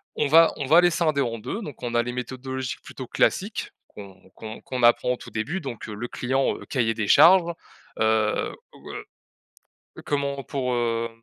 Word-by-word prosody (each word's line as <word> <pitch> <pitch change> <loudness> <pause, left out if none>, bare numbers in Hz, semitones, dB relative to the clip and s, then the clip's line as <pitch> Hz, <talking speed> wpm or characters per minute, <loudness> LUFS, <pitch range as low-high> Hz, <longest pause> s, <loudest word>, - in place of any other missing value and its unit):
On 150 - +1
va 165 +3 +6
on 140 - -3
va 160 +5 +7
les 175 0 +4
scinder 155 -4 +1
en 115 -3 -2
2, 130 - -5
donc 145 -8 -9
on 120 -1 -4
a 120 - +3
les 120 - -4
méthodologies 130 +1 -5
plutôt - - -9
classiques, - - 0 0.2
qu'on 95 -2 -13
qu'on 110 0 -8
qu'on 125 -2 -4
apprend 120 +1 +4
au - - -3
tout - - -12
début, 150 - -3
donc, 130 -7 -7
heu, 110 - -6
le 110 +4 -5
client, 135 +2 0
heu, - - -11
cahier 115 -4 0
des 110 -2 -3
charges, 170 - +6 0.5
heu, 110 -1 +1 0.2
ou, - - -12
heu, - - -7 1.0
comment 140 -1 -2
pour, 130 -3 -2
hem, 115 -1 0
125 Hz, 190 wpm, -24 LUFS, 115-140 Hz, 1.0 s, va